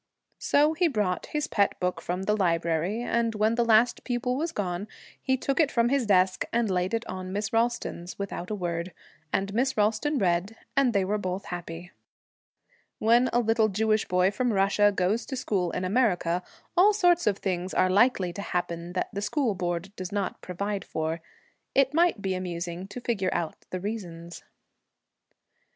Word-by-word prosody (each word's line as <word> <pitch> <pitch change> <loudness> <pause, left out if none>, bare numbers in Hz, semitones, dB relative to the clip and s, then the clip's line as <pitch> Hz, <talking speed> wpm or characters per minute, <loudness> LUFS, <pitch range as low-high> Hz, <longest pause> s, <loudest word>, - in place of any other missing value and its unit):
So 300 +2 +3
he 345 +2 +2
brought 210 - -1
his 300 0 -1
pet 200 -8 +1
book 180 0 -1
from 180 +2 -3
the 210 +2 +1
library, 170 +3 0
and 235 -2 0
when 215 +1 +2
the 235 0 +2
last 230 +1 +3
pupil 250 0 -1
was 320 +5 -1
gone, 185 0 -3 0.3
he 260 -1 +1
took 275 +3 -1
it 310 -4 +4
from 235 -2 +2
his 270 -4 +1
desk 185 -2 +3
and 230 -3 +1
laid 185 +4 0
it 230 +1 -3
on 185 -2 -6
Miss 210 +3 -3
Ralston's, 225 -6 -1
without 200 -3 -5
a 215 - -1
word; 175 -2 -3 0.4
and 195 +1 -1
Miss 260 +3 +1
Ralston 220 +8 +1
read, 190 +1 0 0.2
and 270 -4 +3
they 195 -2 +2
were 210 +2 0
both 185 0 -3
happy. 175 0 -7 1.1
When 235 +3 +4
a - - +2
little 225 -1 +2
Jewish 215 +2 +1
boy 180 +1 +3
from 245 +3 0
Russia 200 +1 +3
goes 200 +4 0
to 265 - -4
school 200 -8 -1
in 180 +2 -3
America, 185 -5 +1 0.3
all 400 +4 +6
sorts 355 - +3
of 200 -2 +2
things 185 -1 -2
are 185 - +3
likely 190 -2 +3
to 200 - -5
happen 175 -2 -3
that 185 - -1
the 200 - -3
School 255 0 0
Board 175 +2 -3
does 185 0 -6
not 200 -1 -2
provide 200 +3 -3
for. 160 +1 -3 0.5
It 275 0 +4
might 335 -9 +2
be 190 -1 0
amusing 175 0 -4
to 245 +5 -8
figure 200 -6 0
out 165 -2 -3
the 185 - -3
reasons. 175 -5 -6
200 Hz, 180 wpm, -27 LUFS, 180-235 Hz, 1.1 s, all